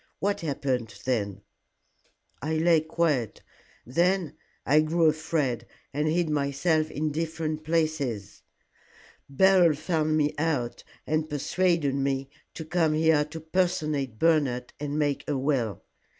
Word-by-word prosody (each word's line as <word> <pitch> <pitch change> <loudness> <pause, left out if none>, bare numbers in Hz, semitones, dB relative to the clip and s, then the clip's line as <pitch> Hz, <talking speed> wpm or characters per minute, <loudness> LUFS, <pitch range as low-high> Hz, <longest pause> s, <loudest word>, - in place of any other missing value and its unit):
What 200 +1 -1
happened 130 -9 -2
then?" 100 -6 -1 1.0
"I 155 +3 -1
lay 165 +1 +4
quiet. 155 - -1 0.4
Then 175 +6 +1 0.3
I 150 +3 +5
grew 165 +2 +1
afraid, 150 -6 0 0.3
and 150 +2 0
hid 170 +2 +1
myself 150 +2 +1
in 155 0 -2
different 160 0 -3
places. 155 -11 -1 0.9
Beryl 180 +2 +5
found 155 0 0
me 150 -1 +1
out, 130 -7 -1 0.2
and 155 0 -1
persuaded 160 0 +1
me 135 0 -1 0.2
to 160 - -6
come 160 -1 +1
here 160 -1 +4
to 160 +2 -8
personate 155 -7 -1
Bernard, 140 -5 +1
and 145 0 -3
make 145 -2 0
a 145 - 0
will. 130 - -1
155 Hz, 120 wpm, -27 LUFS, 135-160 Hz, 1.0 s, I